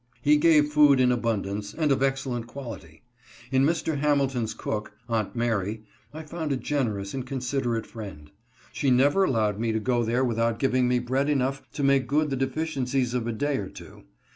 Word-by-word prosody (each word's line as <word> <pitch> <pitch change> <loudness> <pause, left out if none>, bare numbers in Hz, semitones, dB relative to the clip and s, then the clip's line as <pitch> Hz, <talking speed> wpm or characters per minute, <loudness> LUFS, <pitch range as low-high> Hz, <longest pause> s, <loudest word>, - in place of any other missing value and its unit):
He 150 +1 +5
gave 150 -1 +4
food 145 -3 +6
in 125 -1 +4
abundance, 105 -4 -2
and 155 -3 +1
of 135 - +2
excellent 135 -3 -1
quality. 115 - -9 0.5
In 130 0 +3
Mr. 160 -1 0
Hamilton's 135 -6 +1
cook 105 -1 -4
— 115 - -35
Aunt 115 -1 -1
Mary 110 -2 -1
— - - -35
I 155 +2 -8
found 155 -1 -4
a 135 - +1
generous 110 -9 -2
and 130 - -3
considerate 125 -3 -2
friend. 95 -10 -9 0.4
She 140 - 0
never 140 +9 +4
allowed 110 - +1
me 115 0 0
to 110 - 0
go 120 +2 +1
there 120 +3 +1
without 115 -1 0
giv 130 +2 0
ing 130 -1 +3
me 125 0 +2
bread 130 +4 0
enough 135 -1 0
to 145 - -3
make 135 -1 +3
good 150 +1 +1
the - - 0
deficiencies 135 -2 -1
©f 120 -2 -1
a - - 0
day 145 +5 -1
or 95 -2 -4
two. - - -13
130 Hz, 195 wpm, -26 LUFS, 115-140 Hz, 0.5 s, food